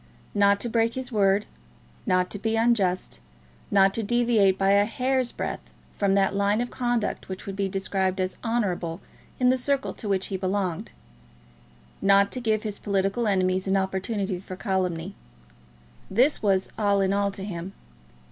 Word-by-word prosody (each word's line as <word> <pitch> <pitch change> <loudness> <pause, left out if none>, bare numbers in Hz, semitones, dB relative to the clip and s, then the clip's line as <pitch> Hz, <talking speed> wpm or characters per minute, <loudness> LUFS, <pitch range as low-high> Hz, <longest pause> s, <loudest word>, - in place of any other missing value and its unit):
Not 200 0 +4
to - - -2
break 230 0 +1
his 260 0 -5
word, 200 -1 +2 0.6
not 185 0 +2
to 205 - -4
be 225 +2 -1
unjust, 200 - +1 0.5
not 195 -1 +4
to 230 - -2
deviate 225 -4 +3
by 195 0 +3
a 200 0 +5
hair's 255 +2 0
breadth - - -4 0.3
from 195 -1 +2
that 195 0 +2
line 200 +2 +1
of 245 0 -2
conduct 240 -5 -2
which 190 0 -6
would 195 - -5
be 195 -1 -1
described 190 0 -1
as 185 0 -2
"honourable" 190 -8 -1 0.4
in 250 -1 +4
the 255 0 +2
circle 275 +1 0
to 210 - -7
which 190 -1 +1
he - - 0
belonged; 185 - -2 1.1
not 200 0 +4
to 255 - -4
give 220 -2 0
his 210 -2 -5
political 200 +3 0
enemies 185 -1 +1
an 190 +1 +2
opportunity 190 0 -2
for 185 0 -8
calumny, 185 -3 -2 1.0
this 250 +9 +2
was 190 -2 +2
all 200 -1 +2
in 195 0 +2
all 200 0 +1
to 195 -1 -7
him. 190 -1 -6
200 Hz, 165 wpm, -25 LUFS, 190-225 Hz, 1.1 s, a